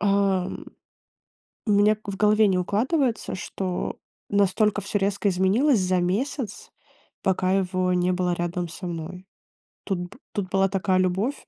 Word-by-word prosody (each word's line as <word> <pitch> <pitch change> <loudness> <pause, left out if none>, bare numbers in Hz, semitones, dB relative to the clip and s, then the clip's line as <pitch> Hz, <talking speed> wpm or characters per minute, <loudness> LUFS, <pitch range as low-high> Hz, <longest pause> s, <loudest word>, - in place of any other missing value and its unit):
Ам, 195 -2 +1 1.0
у 210 - +3
меня 205 +1 +5
к 215 - -20
в 195 - -4
голове 210 +1 +4
не 190 -2 +2
укладывается, 230 - 0
что 185 -2 -4 0.3
настолько 205 +1 +2
всё 200 - -1
резко 200 +1 0
изменилось 200 +8 +3
за 185 0 +1
месяц, 215 +7 -2 0.5
пока 185 -1 +1
его 185 -1 +1
не 180 0 +2
было 180 -1 0
рядом 175 0 -2
со 180 +2 -7
мной. 175 +2 -6 0.6
Тут 195 -3 -1
бы 180 +7 -8
тут 195 -3 -3
была 195 0 +3
такая 185 -1 +1
любовь. 190 +9 0
195 Hz, 145 wpm, -25 LUFS, 180-210 Hz, 1.0 s, меня